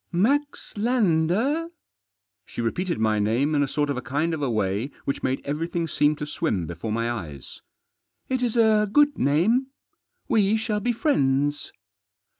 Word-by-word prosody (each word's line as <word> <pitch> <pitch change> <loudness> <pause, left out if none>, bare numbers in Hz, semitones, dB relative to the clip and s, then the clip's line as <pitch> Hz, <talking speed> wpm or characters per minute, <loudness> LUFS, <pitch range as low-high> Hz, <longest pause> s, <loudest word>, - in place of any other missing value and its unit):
" - - -50 0.2
Max 290 +2 -2
Lander? 220 - +1 0.4
" 100 -1 -63
She - - -9
repeated 170 +10 -1
my 110 -1 +1
name 120 +9 +1
in 145 - +2
a 140 - +1
sort 145 +2 -1
of 140 - -3
a - - -3
kind 150 +6 -1
of 155 - -3
a 140 - 0
way 105 +2 -1 0.2
which 140 - -2
made 130 +1 -1
everything 165 +3 -2
seem 150 0 +2
to 150 - -5
swim 100 - -2
before 85 +7 -5
my 115 +2 -1
eyes. 80 - -6 0.3
" - - -56
It 260 -1 -1
is 240 -1 0
a 215 -2 +4
good 295 +3 +3
name. 195 - +2 0.6
We 215 0 +3
shall 220 -1 -1
be 245 +4 0
friends." 145 - 0
150 Hz, 175 wpm, -24 LUFS, -, 0.6 s, a